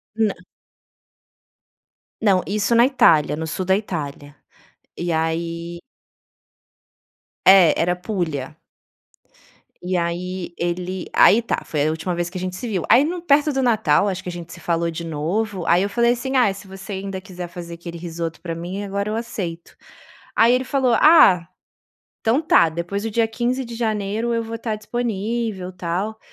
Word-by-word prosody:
Nã 220 -3 +1 1.9
Não, 195 -4 +3
isso 210 +3 +1
na 235 +1 +6
Itália, 160 - +4
no 160 +1 -4
sul 180 +4 -3
da 190 - +3
Itália. 150 -7 -5 0.6
E 175 0 -2
aí 170 +1 -2 1.7
É, 190 -4 +8
era 180 +1 +1
Pulha. 175 -8 -4 1.3
E 180 +1 -1
aí 175 +1 -3
ele 180 +1 -3
aí 230 +4 +6
tá, 230 - -2
foi 150 -1 0
a - - +2
última 170 +2 -3
vez 175 0 -2
que 185 - -7
a - - -5
gente 185 0 -4
se 240 - -5
viu. 190 -6 -2
Aí 260 - +7
no 345 +3 -3
perto 295 -2 +3
do 270 - 0
Natal, 215 - +3
acho 185 -1 -3
que 180 - -5
a - - -4
gente 175 -1 -8
se - - -11
falou 170 0 -1
de 165 +1 -6
novo, 175 +5 -2
ai 175 +2 +4
eu 200 - -1
falei 235 +3 +3
assim: 265 +2 -4
"Ah, 225 -6 +4
se 195 0 -12
você 195 +1 -8
ainda 190 0 -4
quiser 180 -2 -8
fazer 170 0 -8
aquele 170 0 -8
risoto 165 -1 -5
para 165 -2 -4
mim, 180 +4 -5
agora 200 +1 -3
eu 215 - -2
aceito". 190 -8 -5 0.6
Aí 235 +2 +5
ele 255 - 0
falou: 260 -3 +1
"Ah, 185 - +6 0.7
então 235 +7 +2
tá, 170 - +4
depois 170 +5 -4
do 225 - -3
dia 225 +1 +1
15 245 +3 -1
de 235 -1 -8
janeiro 220 0 -1
eu 230 - 0
vou 225 0 -5
estar 225 -1 -3
disponível, 215 -3 -3
tal. 185 +5 -3
190 Hz, 170 wpm, -21 LUFS, 170-225 Hz, 1.9 s, É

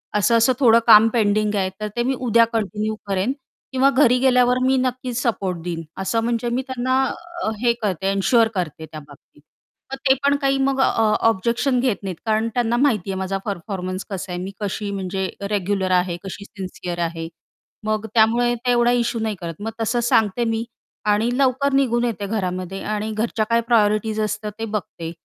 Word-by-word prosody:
असं-असं 230 +4 +4
थोडं 230 -4 +6
काम 220 0 +9
पेंडिंग 210 -2 +1
आहे 190 -2 0
तर 215 - -3
ते 240 - 0
मी 260 +2 0
उद्या 235 -2 +4
कंटिन्यू 215 0 -1
करेन 195 +4 0 0.4
किंवा 265 +1 +4
घरी 260 -3 +4
गेल्यावर 250 -1 +4
मी 265 0 +3
नक्कीच 255 -1 -2
सपोर्ट 195 -7 -1
देईन." 170 -1 -4 0.2
असं 225 +4 0
म्हणजे 235 0 -1
मी 245 +2 0
त्यांना 260 +1 0 0.4
अ, - - 0
हे 240 -1 +3
करते 195 -3 -1
एन्शुअर 225 +4 +3
करते 160 -4 -3
त्या 155 -1 -9
बाबतीत. 145 0 -18 0.5
तर - - -2
ते - - +8
पण 285 0 +3
काही 275 0 +2
मग 270 0 0
अ, - - +5 0.4
ऑब्जेक्शन 235 +5 0
घेत 245 -5 -1
नाहीत 190 -2 -4
कारण 220 0 +1
त्यांना 240 -1 +1
माहिती 230 -8 +1
आहे 190 - -3
माझा 190 +1 -2
परफॉर्मन्स 185 -1 -4
कसा 190 -2 -5
आहे, 175 0 -4
मी 190 +2 -5
कशी 205 0 -3
म्हणजे 190 -1 -3 0.2
रेग्युलर 195 -2 -1
आहे, 180 -1 +1
कशी 200 +1 -7
सिन्सिअर 185 -3 -7
आहे. 165 0 -6 0.6
मग 215 0 -1
त्यामुळे 235 +2 +3
ते 245 +1 -1
एवढा 240 0 +3
इश्यू 240 -1 0
नाही 220 -1 -1
करत 165 +1 -6
मग 225 +2 -3
तसं 235 +2 0
सांगते 220 +1 +2
मी 225 0 -1 0.5
आणि 215 +3 +2
लवकर 275 +1 +2
निघून 245 -3 +2
येते 215 -4 -3
घरामध्ये 185 -2 -3
आणि 215 +1 -2
घरच्या 220 0 -1
काय 230 0 +3
प्रायोरिटीज 215 -1 +2
असतात 210 0 -3
ते 225 - -2
बघते 195 -6 -5
220 Hz, 185 wpm, -21 LUFS, 195-240 Hz, 0.6 s, काम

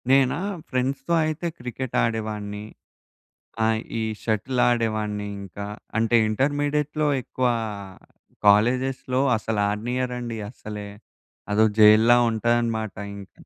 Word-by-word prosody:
నేనా? 135 0 +4 0.3
ఫ్రెండ్స్‌తో 135 +5 -1
అయితే 155 +2 -2
క్రికెట్టు 125 +1 -4
ఆడేవాడిని. 105 -2 -3 1.0
ఆ! - - +3 0.3
ఈ - - -1 0.2
షటిల్ 120 +4 -1
ఆడేవాడిని 110 -3 -1
ఇంకా. 100 +1 -7 0.3
అంటే 115 +1 +2
ఇంటర్మీడియేట్‌లో 145 +5 0
ఎక్కువ 125 +1 -1 1.0
కాలేజెస్‌లో 125 +5 +3 0.2
అసలాడనీయరండి 115 +3 -2
అసలే. 105 -4 -8 0.6
అదో 110 +2 +4
జైలులా 110 +3 +7
ఉంటదనమాట 115 -1 0 0.2
ఇంక. 100 -1 -10
115 Hz, 90 wpm, -24 LUFS, 105-130 Hz, 1.0 s, జైలులా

